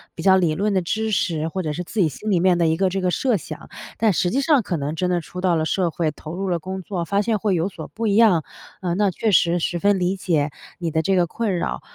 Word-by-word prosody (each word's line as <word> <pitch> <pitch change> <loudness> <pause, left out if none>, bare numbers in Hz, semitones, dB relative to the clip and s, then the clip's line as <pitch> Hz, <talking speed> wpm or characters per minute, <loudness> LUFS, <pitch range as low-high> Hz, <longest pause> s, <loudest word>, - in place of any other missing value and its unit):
比 165 - -6
较 190 0 +6
理 165 -4 +1
论 205 +4 0
的 190 - +2
知 220 +5 -2
识， 160 -5 0
或 185 +3 -3
者 155 -2 -2
是 180 +4 -4
自 210 - -5
己 175 - +4
心 215 +9 -6
里 185 -4 +3
面 180 0 +3
的 170 -1 +2
一 160 0 +1
个 190 -1 +2
这 190 +1 -2
个 180 - +1
设 255 +3 +1
想。 155 -1 -9 0.3
但 220 -2 +3
实 175 - +1
际 265 +8 +1
上 285 -3 +4
可 180 -5 -3
能 145 +2 -3
真 180 +2 -1
的 175 -1 +1
出 180 +3 -8
到 180 -2 +2
了 160 0 0
社 180 +1 +1
会， 160 -1 -1
投 155 +3 -9
入 195 0 -3
了 170 -1 0
工 190 +3 -5
作， 180 -2 -4
发 200 +3 +1
现 220 0 0
会 200 -3 +1
有 170 +2 0
所 165 -5 -9
不 225 0 -3
一 200 - +2
样。 205 -9 +5 0.4
嗯， 175 -2 -1
那 205 -2 +2
确 215 +4 0
实 175 -1 +3
十 175 +1 -1
分 200 +1 +3
理 180 +2 0
解 155 -6 0 0.3
你 170 -2 -2
的 160 - +1
这 195 +3 +1
个 180 - +3
困 205 0 -2
扰。 65 - -3
180 Hz, 310 characters per minute, -22 LUFS, 165-200 Hz, 0.4 s, 较